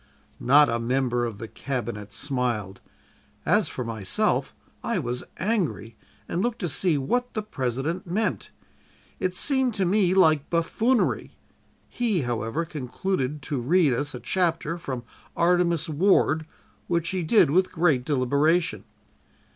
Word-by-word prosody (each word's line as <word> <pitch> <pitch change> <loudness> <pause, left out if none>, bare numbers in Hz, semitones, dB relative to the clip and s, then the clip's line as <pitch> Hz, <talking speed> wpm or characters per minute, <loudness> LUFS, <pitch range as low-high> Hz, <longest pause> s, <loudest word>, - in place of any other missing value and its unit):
"Not 145 +4 +6
a 115 - -1
member 120 0 0
of 115 -3 -5
the 115 - -7
Cabinet 120 -6 -5
smiled; 120 -7 -2 0.6
as - - +3
for 125 - -4
myself, 110 -5 0 0.3
I - - -1
was 120 +1 -3
angry, 175 - -1 0.3
and 175 - -2
looked 240 +1 -1
to 175 - -1
see 165 +1 +2
what 245 - -1
the 215 - -1
President 150 - -3
meant. 205 +6 -1 0.7
It 185 0 -1
seemed 260 +1 +2
to 195 -3 +1
me 185 0 +2
like 155 -6 +4
buffoonery. 220 +9 0 0.5
He, 225 -8 0
however, 120 +5 -2
concluded 150 -1 -3
to 135 -1 -2
read 155 +2 +3
us 145 +3 -2
a - - -6
chapter 165 +4 -1
from 130 -7 -5 0.3
'Artemus 170 -2 +2
Ward,' 160 -1 +2 0.4
which 170 -1 0
he 185 -1 -1
did 165 -2 +4
with 185 +4 +2
great 160 -7 +2
deliberation. 150 +6 +1
155 Hz, 135 wpm, -25 LUFS, 125-180 Hz, 0.7 s, Not